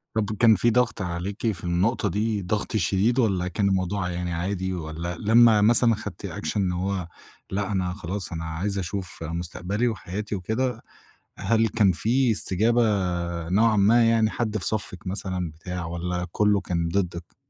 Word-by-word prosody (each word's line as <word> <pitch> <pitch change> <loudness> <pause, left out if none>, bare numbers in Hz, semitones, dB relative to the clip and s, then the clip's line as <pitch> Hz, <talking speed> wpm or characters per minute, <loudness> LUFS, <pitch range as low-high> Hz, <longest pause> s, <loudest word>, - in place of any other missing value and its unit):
طب 110 -1 0
كان 115 -2 +6
في 115 +5 +2
ضغط 115 -2 +1
عليكِ 95 +5 -2
في 90 -5 -9
النقطة 90 +7 +1
دي 105 +2 -1
ضغط 100 +4 -2
شديد 100 +6 +1
والّا 95 -7 +1
كان 100 +2 0
الموضوع 95 0 -1
يعني 90 0 -3
عادي؟ 95 +2 -2
والّا 85 0 -5
لما 110 0 +5
مثلًا 115 +2 +5
خدتي 105 - -7
أكشن 105 - -2
إن 90 -2 +1
هو 90 0 -2 0.4
لأ 100 +2 -2
أنا 90 -2 -1
خلاص 95 +1 -5
أنا 80 -1 -4
عايزة 95 +5 -2
أشوف 90 -1 -5
مستقبلي 85 +7 -2
وحياتي 105 -1 -4
وكده، 110 +7 -2 0.6
هل 115 0 +2
كان 105 -3 +3
في 120 +7 +1
استجابة 110 +3 +2 0.7
نوعًا 110 +4 +3
ما، 115 +4 +5
يعني 115 -1 +3
حد 110 -2 -2
في 95 - -4
صفِّك 100 -4 -4
مثلًا 90 -3 -3
بتاع، 85 +2 -6
والّا 90 +1 -3
كله 105 0 +2
كان 85 -3 -1
ضدِك؟ 90 -2 -3
100 Hz, 160 wpm, -25 LUFS, 90-110 Hz, 0.7 s, كان